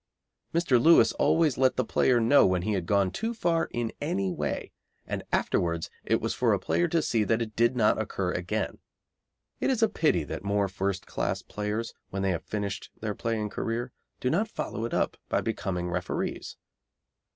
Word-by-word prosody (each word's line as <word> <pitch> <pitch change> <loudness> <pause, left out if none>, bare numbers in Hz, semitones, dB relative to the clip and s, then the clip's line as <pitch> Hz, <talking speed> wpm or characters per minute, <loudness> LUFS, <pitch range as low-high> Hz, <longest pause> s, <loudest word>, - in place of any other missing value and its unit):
Mr. 160 -8 +3
Lewis 165 +5 +7
always 160 -6 +2
let 130 -1 +4
the 130 - 0
player 125 +2 +3
know 120 +5 +6
when 90 -2 +2
he 110 - 0
had 90 -4 -2
gone 100 -2 +2
too 225 - -3
far 170 -6 +1
in 120 -1 -2
any 185 +6 0
way, 175 - -3 0.3
and - - -3
afterwards 85 -1 0
it - - +2
was - - -2
for - - +2
a - - +1
player 85 +2 +1
to 165 -2 +1
see 115 -4 +1
that 110 +2 +1
it 110 -2 -4
did 120 +2 +3
not 110 -2 +3
occur 95 -4 -2
again. 90 0 -2 0.8
It - - +1
is 245 -4 +2
a - - +6
pity 120 - +1
that 75 - -6
more 100 0 +1
first 95 0 -2
class - - -2
players, 105 +2 -3 0.2
when 95 0 -3
they 95 - +2
have 85 - -2
finished 100 -2 -4
their 105 -1 -2
playing 110 -1 -2
career, 120 +4 -3 0.3
do 125 - 0
not 200 +8 +1
follow 115 - -4
it 115 - -5
up - - 0
by - - +2
becoming 90 -2 -2
referees. - - -3
110 Hz, 190 wpm, -28 LUFS, 95-130 Hz, 0.8 s, Lewis